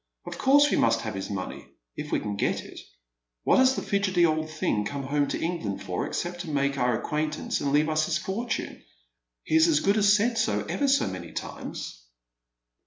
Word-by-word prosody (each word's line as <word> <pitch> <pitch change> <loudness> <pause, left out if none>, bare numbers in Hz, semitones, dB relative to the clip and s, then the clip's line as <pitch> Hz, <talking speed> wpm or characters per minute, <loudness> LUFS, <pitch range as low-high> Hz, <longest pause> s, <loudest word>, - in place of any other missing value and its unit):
Of - - -7
course 280 +2 +6
w 290 - +2
a - - +3
must 115 0 +3
have 110 -3 -4
his 95 0 -5
money 100 -3 -5 0.2
— - - -58
if - - -6
we - - +2
can 105 -1 -4
get 100 - -1
it. - - -11 0.6
What - - +4
has 260 0 +5
the - - -3
hdgely 190 -4 +2
old 155 0 -1
thing 155 -9 -1
come 140 +7 -4
home 145 +1 0
to - - -3
England 165 - -3
for 90 - -3
except 175 0 -3
to 170 - -7
make 140 -1 0
oui 125 -3 +1
acquaintance 150 +4 -2
and 140 - 0
leave 150 +2 +3
us 155 0 +1
his 170 - +1
fortune? 215 +7 -4 0.6
He - - -5
has 160 +1 +6
as 155 -3 +3
good 200 +5 +2
as 205 -1 +5
said 225 +3 +2
60 220 - 0
ever 285 - +1
so 275 +1 +3
many 90 -3 -6
times." - - -6
155 Hz, 215 wpm, -27 LUFS, -, 0.6 s, course